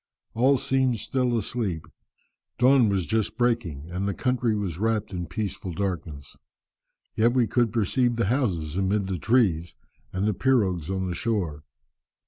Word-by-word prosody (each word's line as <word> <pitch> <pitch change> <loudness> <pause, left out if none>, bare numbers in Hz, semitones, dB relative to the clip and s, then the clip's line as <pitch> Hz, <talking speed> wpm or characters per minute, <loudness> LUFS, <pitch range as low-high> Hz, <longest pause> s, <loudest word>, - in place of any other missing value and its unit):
All 130 +4 +4
seemed 130 -2 +1
still 125 +1 0
asleep. 100 -6 -3 0.7
Dawn 125 -2 +5
was 95 -3 0
but - - -16
just 110 -2 0
breaking, 100 - -1
and 95 +3 -2
the 100 - -2
country 125 -3 0
was 95 -5 -3
wrapped 110 -2 0
in 90 -1 -4
peaceful 100 -4 -4
darkness. 80 -6 -4 0.8
Yet 115 +1 +3
we 125 -2 +3
could 115 +1 +1
perceive 120 +2 +1
the 115 - +1
houses 95 - -1
amid 100 +1 +1
the 95 -2 -3
trees, 90 - +2 0.4
and 95 +2 -1
the 105 - +2
pirogues 95 - +1
on 95 -1 -1
the 90 - -2
shore. 85 -8 -2
105 Hz, 155 wpm, -26 LUFS, 90-120 Hz, 0.8 s, Dawn